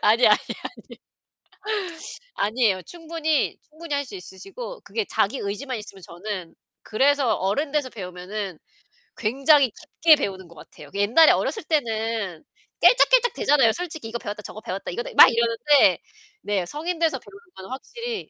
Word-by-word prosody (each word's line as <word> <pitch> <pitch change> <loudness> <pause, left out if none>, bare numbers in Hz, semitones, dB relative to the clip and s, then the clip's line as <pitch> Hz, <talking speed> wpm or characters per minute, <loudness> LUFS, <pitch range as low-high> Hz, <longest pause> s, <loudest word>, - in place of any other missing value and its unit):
아니, 225 +4 +5
아니, 210 - +6 0.5
아니. - - -13 1.4
아니에요. 210 -3 +1
충분히, 325 - -2
충분히 310 0 -7
할 285 0 -1
수 245 - -11
있으시고 390 - -9
그게 450 - -3
자기 230 +7 0
의지만 235 +5 -4
있으면 200 -2 -11
저는 175 0 -7 0.3
그래서 270 0 +2
어른 210 +11 -1
돼서 295 -4 0
배우면은 185 -2 -6 0.6
굉장히 270 +3 +3
깊게 315 +8 +3
배우는 190 -8 -4
것 170 - -17
같아요. 150 -1 -14
옛날에 220 +11 +5
어렸을 440 - -1
때는 225 - -2 0.4
깨짝깨짝대잖아요. 475 - +5
솔직히 320 -6 -5
이거 235 - -3
배웠다 210 0 -6
저거 210 - -9
배웠다, 190 -2 -5
이거 240 - -3
했다, - - -8
막 - - +8
이러는데. 235 +5 +3 0.4
네, 200 -4 -1
성인 325 - -4
돼서 330 -1 +1
배우는 400 - -15 0.2
거는 190 - -10
확실히 460 - -6
235 Hz, 355 characters per minute, -24 LUFS, 200-310 Hz, 1.4 s, 막